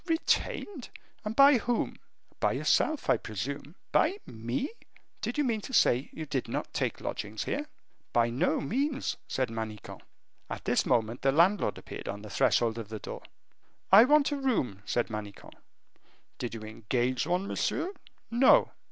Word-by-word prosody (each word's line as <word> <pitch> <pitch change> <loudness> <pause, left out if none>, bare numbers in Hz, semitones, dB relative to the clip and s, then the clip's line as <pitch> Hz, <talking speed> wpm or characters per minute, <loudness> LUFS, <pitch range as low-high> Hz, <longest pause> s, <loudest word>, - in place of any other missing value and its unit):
"Retained 325 - -1 0.3
and 215 +1 -4
by 275 -1 +7
whom?" 240 +1 -1 0.4
"By - - +2
yourself, 310 -2 +1
I - - +4
presume." 140 - -5 0.2
"By 365 +6 +3
me?" 120 - -3 0.5
"Do - - -1
you 295 - +2
mean 230 -5 0
to 260 - -9
say 125 +4 +3
you 160 - -6
did 140 -4 -2
not - - -4
take - - -1
lodgings 105 +1 -4
here?" 295 +1 -3 0.4
"By 120 0 +2
no 130 +6 +1
means," 275 - -1
said 130 -2 -1
Manicamp. 110 -2 -6 0.5
At - - -6
this - - +2
moment 115 +1 +1
the 135 - +3
landlord 175 +8 +3
appeared - - -8
on 105 +1 -5
the 105 - -9
threshold 115 -1 +2
of 110 -2 -7
the 110 - -5
door. - - -7 0.7
"I 205 +5 +10
want 295 +1 +4
a 290 - -1
room," 175 - 0
said 120 -1 0
Manicamp. 105 -2 -7 0.9
"Did 120 -1 -4
you 115 - -7
engage 120 +5 -1
one, 180 +2 0
monsieur?" 345 - -1 0.4
"No." 245 +3 +5
140 Hz, 160 wpm, -29 LUFS, -, 0.9 s, I